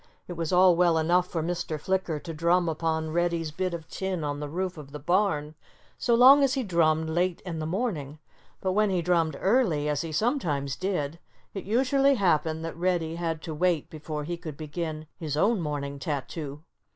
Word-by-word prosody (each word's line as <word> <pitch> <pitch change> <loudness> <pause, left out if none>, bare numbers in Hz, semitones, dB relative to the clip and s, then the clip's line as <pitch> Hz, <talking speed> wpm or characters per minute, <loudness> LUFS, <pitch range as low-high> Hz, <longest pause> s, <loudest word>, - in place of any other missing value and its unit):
It 180 - -5
was 165 -2 -3
all 180 -1 +6
well 170 -1 +3
enough 175 +3 +2
for 165 -3 -3
Mr. 165 -2 -3
Flicker 185 -2 -1
to 165 - -6
drum 170 +3 +2
upon 160 0 -1
Reddy's 170 -1 0
bit 185 +4 -2
of 170 -2 -6
tin 190 -4 -3
on 145 -1 -2
the 145 0 -5
roof 185 +3 -3
of 145 -3 -11
the - - -4
barn 165 -2 +1 0.5
so 235 - +3
long 265 +4 +8
as 275 -1 +3
he 265 - 0
drummed 160 -5 +2
late 175 +2 0
in 165 -3 -4
the 155 - -3
morning. 165 - -2 0.4
But 190 - 0
when 210 +2 +2
he 180 -3 0
drummed 165 -4 +1
early, 190 - +2
as 150 -1 0
he 165 -2 -5
sometimes 155 - 0
did, 165 -4 -2 0.3
it 195 - -6
usually 270 +5 +3
happened 160 - +1
that 165 - -5
Reddy 170 -2 -1
had 165 -2 -3
to 160 - -5
wait 170 -1 0
before 155 -1 -5
he 170 +3 -4
could 160 -4 -8
begin 155 0 -5
his 150 -4 -3
own 205 +4 +2
morning 140 -2 -3
tattoo. 145 +1 -4
165 Hz, 195 wpm, -27 LUFS, 155-185 Hz, 0.5 s, long